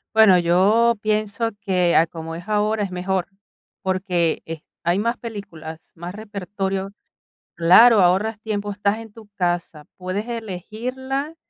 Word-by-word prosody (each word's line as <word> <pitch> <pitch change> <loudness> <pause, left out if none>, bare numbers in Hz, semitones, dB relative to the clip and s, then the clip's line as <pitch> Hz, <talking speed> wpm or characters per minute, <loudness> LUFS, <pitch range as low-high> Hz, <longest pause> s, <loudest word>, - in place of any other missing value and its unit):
Bueno, 210 -5 +7
yo 200 +7 +4
pienso 215 +1 0
que, 180 -3 +1
a 165 - +5
como 165 0 -7
es 175 +4 -9
ahora, 210 0 +1
es 200 - -2
mejor, 180 0 -1 0.6
porque, 185 -3 0
eh, 160 -1 -6 0.2
hay 175 +2 +1
más 230 +3 0
películas, 165 -8 -8
más 175 +2 -7
repertorio. 195 -2 -4 0.7
Claro, 205 +7 +7
ahorras 195 +5 +2
tiempo, 205 -2 -3
estás 200 +1 0
en 225 -2 -10
tu 220 -2 -14
casa, 175 -4 -2
puedes 190 +5 -4
elegirla, 250 - -4
200 Hz, 135 wpm, -22 LUFS, 175-220 Hz, 0.7 s, Bueno